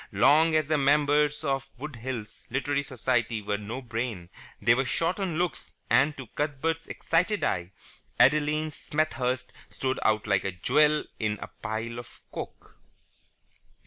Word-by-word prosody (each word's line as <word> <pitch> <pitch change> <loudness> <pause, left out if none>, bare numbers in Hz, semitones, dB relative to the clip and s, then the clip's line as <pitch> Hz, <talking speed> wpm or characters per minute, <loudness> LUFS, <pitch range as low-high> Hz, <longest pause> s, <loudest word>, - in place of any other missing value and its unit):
Long 155 +10 +5
as 155 -2 +2
the 155 -1 +2
members 150 +1 +3
of 135 -2 -1
Wood 145 0 -7
Hills 115 -3 -6
Literary 140 +3 0
Society 120 -4 0
were 105 0 -3
on 110 +6 -5
brain, 115 -7 -4 0.3
they 115 +3 +5
were 130 +3 +2
short 165 +8 -1
on 180 -5 -1
looks, 170 -8 -2 0.2
and, 140 +6 +4
to 135 - -7
Cuthbert's 150 +6 -2
excited 180 +6 0
eye, 85 +1 0 0.5
Adeline 150 +3 +4
Smethurst 135 -4 -1 0.2
stood 130 0 -2
out 110 -1 +2
like 100 -3 +2
a 95 - -1
jewel 150 - +3 0.2
in 105 -1 0
a - - -7
pile 115 +1 -3
of 120 - -12
coke. - - -8
135 Hz, 145 wpm, -28 LUFS, 115-150 Hz, 0.5 s, Long